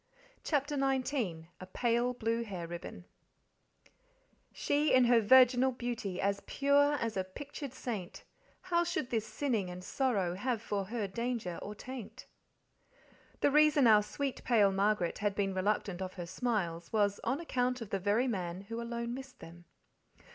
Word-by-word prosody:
CHAPTER 290 -1 0
XIX 260 - -1
A 185 - -9
Pale 240 +1 +1
Blue 230 0 -1
Hair 190 -6 -6
Ribbon 175 +1 -8 1.5
She 295 +1 +1
in 255 -1 +6
her 240 -1 +5
virginal 255 +3 +6
beauty 240 -7 -4
As 200 0 0
pure 285 +1 +3
as 230 -6 -2
a 190 - 0
pictured 280 +7 -8
saint, 205 -8 -5 0.4
How 345 -2 +1
should 345 -7 -3
this 220 -2 -1
sinning 215 -4 -1
and 180 0 -8
sorrow 200 -8 0
Have 230 +5 -1
for 205 -3 -3
her 215 0 -3
danger 230 -4 -3
or 210 - -6
taint? 255 0 -8 1.2
The - - +4
reason 300 -2 +5
our 215 -2 +7
sweet 275 +5 -4
pale 210 -5 +4
Margaret 195 -2 +1
had 205 -1 0
been 195 -2 0
reluctant 190 -1 -1
of 185 0 -4
her 175 -2 -5
smiles 175 -5 -2
was 205 -2 +1
on 260 +5 0
account 250 -6 -1
of 225 -4 -8
the 195 - 0
very 210 +7 +1
man 180 -5 -3
who 230 +4 -6
alone 235 0 -4
missed 265 0 -9
them. 175 +1 -12
230 Hz, 155 wpm, -32 LUFS, 195-255 Hz, 1.5 s, our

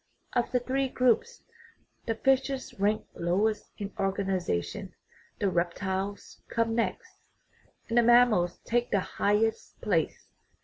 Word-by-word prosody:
Of 240 -1 +1
the 250 - +2
three 265 +2 -1
groups 255 - +1 0.6
the 225 - 0
fishes 270 +2 +1
rank 205 +2 +1
lowest 205 +5 0
in 200 -1 -5
organization, 190 - -2 0.4
the 200 - 0
reptiles 190 +3 -2
come 230 -1 0
next, 345 - -2 0.7
and 235 +1 +3
the - - +7
mammals 235 -7 +4
take 240 +1 +1
the 200 - +2
highest 210 +4 0
place. - - -1
220 Hz, 120 wpm, -29 LUFS, 195-245 Hz, 0.7 s, the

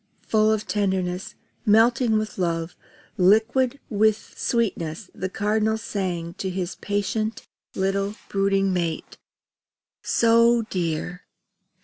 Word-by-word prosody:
Full 215 0 +3
of 215 -1 0
tenderness, 190 -3 -1 0.3
melting 225 +1 +4
with 215 -2 -3
love, 165 -1 -1 0.4
liquid 225 +8 +3
with 215 -1 +1
sweetness, 185 -6 -2
the 185 - -4
Cardinal 215 +2 0
sang 185 -6 -3
to 190 - -2
his 185 -1 -3
patient 205 +2 -2 0.3
little 195 +2 -1
brooding 195 -1 +1
mate: 170 -3 -3 0.8
"So 230 0 +4
dear! 175 0 -3
200 Hz, 100 wpm, -24 LUFS, 185-220 Hz, 0.8 s, melting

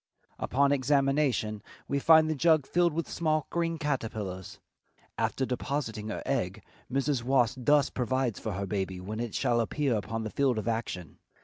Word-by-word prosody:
Upon 140 +2 +2
examination 135 -5 +1 0.3
we 140 - 0
find 160 +1 +6
the 155 - +1
jug 155 -1 +3
filled 175 +4 +2
with 165 +2 -3
small 155 -3 0
green 165 -1 0
caterpillars. 110 - -4 0.6
After 130 - 0
depositing 125 -4 -3
her 110 - -4
egg - - -2 0.3
Mrs. 135 -1 0
Wasp 130 0 +2
thus 145 +3 +3
provides 130 -2 -1
for 110 - -4
her 100 +2 -3
baby 95 -1 -3
when 105 +4 -5
it 120 -2 -4
shall 120 - +2
appear 135 +2 0
upon 110 +2 -3
the 110 - -4
field 135 -4 +1
of 110 - -3
action. 110 -8 -3
130 Hz, 165 wpm, -29 LUFS, 110-145 Hz, 0.6 s, find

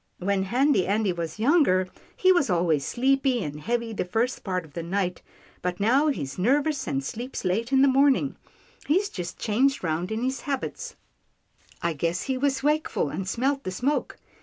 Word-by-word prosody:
When 190 +1 0
Handy 250 -2 +2
Andy 205 -1 +1
was 170 0 -5
younger, 225 - +3 0.3
he 375 - +5
was 350 - +3
always 170 -5 +2
sleepy 265 - +1
and 150 0 -6
heavy 235 +3 -2
the - - -1
first 225 +7 -1
part 185 -3 -2
of 150 - -18
the 170 - -4
night, 180 +1 -2 0.4
but 180 0 -3
now 255 +9 +3
he's 145 - -3
nervous 280 +7 +1
and 135 -1 -1
sleeps 240 - -5
late 220 +7 0
in 265 0 +5
the - - +6
morning 275 +1 +3 0.2
— - - -26
he's 380 +7 +2
just 175 -2 -6
changed 255 +4 +1
round 170 +3 -1
in 220 +2 -2
his 260 +1 -1
habits 275 -2 -4 0.4
— - - -31
I 170 -1 +1
guess 170 +4 -1
he 265 - -1
was 270 0 0
wakeful, 300 - +1
and 185 +5 -4
smelt 275 +6 0
the - - -3
smoke. 250 +11 -1
225 Hz, 185 wpm, -26 LUFS, 180-270 Hz, 0.4 s, the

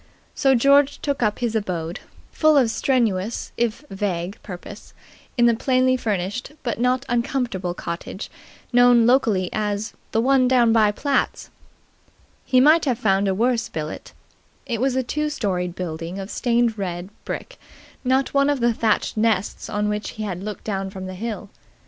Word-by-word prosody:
So 270 -1 +3
George 280 +3 +4
took 285 -2 -2
up 210 -3 +1
his 235 -2 -2
abode, 175 -4 -2 0.3
full 310 -2 +4
of 245 -5 +4
strenuous 225 -5 0
if 235 +4 -1
vague 190 0 -3
purpose, 190 +2 -10 0.4
in 240 - +5
the 235 - +5
plainly 255 +2 +2
furnished 215 +2 -3
but 235 -4 -2
not 250 +2 +1
uncomfortable 235 -8 -1
cottage 170 +4 -6 0.4
known 245 -1 +6
locally 225 -7 +3
as 210 0 -2 0.2
"the 225 - +1
one 260 +1 +4
down 240 -3 +4
by 215 -2 +4
Platt's." 275 +6 -1 0.9
He 255 - +3
might 310 +5 +5
have 255 -5 +1
found 200 -3 +2
a 190 - +1
worse 235 +2 +1
billet. 155 -1 -6 0.5
It 235 -4 -3
was 265 -1 +1
a 260 - +1
two 300 +5 -2
storied 185 - -2
building 170 0 -5
of 195 +1 -6
stained 235 -2 +1
red 180 0 -4
brick, - - -6 0.4
not 260 +1 +1
one 280 0 +3
of 285 -2 +1
the 235 -1 +2
thatched 220 -1 0
nests 215 -3 0
on 210 0 -1
which 210 0 -2
he 215 - -3
had 185 -4 -4
looked 210 -1 -6
down 195 -2 -3
from 190 -1 -7
the 185 - -6
hill. 205 0 -5
225 Hz, 165 wpm, -22 LUFS, 195-255 Hz, 0.9 s, known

